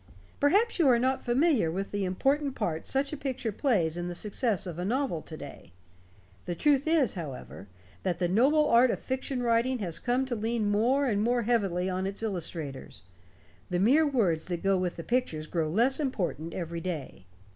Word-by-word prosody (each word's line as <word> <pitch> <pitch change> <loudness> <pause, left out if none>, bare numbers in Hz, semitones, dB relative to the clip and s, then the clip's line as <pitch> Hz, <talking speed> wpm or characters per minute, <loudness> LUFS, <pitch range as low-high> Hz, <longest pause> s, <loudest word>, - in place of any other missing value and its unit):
Perhaps 395 +10 +3
you 325 - +5
are 240 - +5
not 260 +2 0
familiar 255 - +2
with 195 +4 -4
the 205 -1 -1
important 270 +9 0
part 165 -7 -3
such 275 +2 0
a - - -3
picture 260 -5 -3
plays 190 - +1
in 175 0 -3
the 175 - -5
success 210 +1 -1
of 175 -2 -6
a - - -2
novel 240 - -1
to 155 - -9
day. 140 - -11 0.7
The 175 - -2
truth 290 - +2
is, 315 - +3
however, 140 - -8 0.3
that 180 -3 -1
the 175 0 0
noble 275 - +3
art 245 -1 +5
of - - 0
fiction 260 -1 -3
writing 235 +2 +2
has 170 -7 -2
come 250 +5 0
to 255 -2 -3
lean 220 -1 -1
more 250 +7 +2
and 210 -6 +1
more 240 +2 +1
heavily 195 -6 +1
on 185 0 -1
its 200 +3 -4
illustrators. 165 - -5 0.7
The 180 - 0
mere 270 - +4
words 195 - +1
that 175 -2 -4
go 195 0 +3
with 185 -1 -1
the 165 - -7
pictures 235 -11 -1
grow 160 -1 -1
less 235 - +3
important 185 - -2
every 170 -1 -4
day. 150 - -6
215 Hz, 190 wpm, -28 LUFS, 175-260 Hz, 0.7 s, you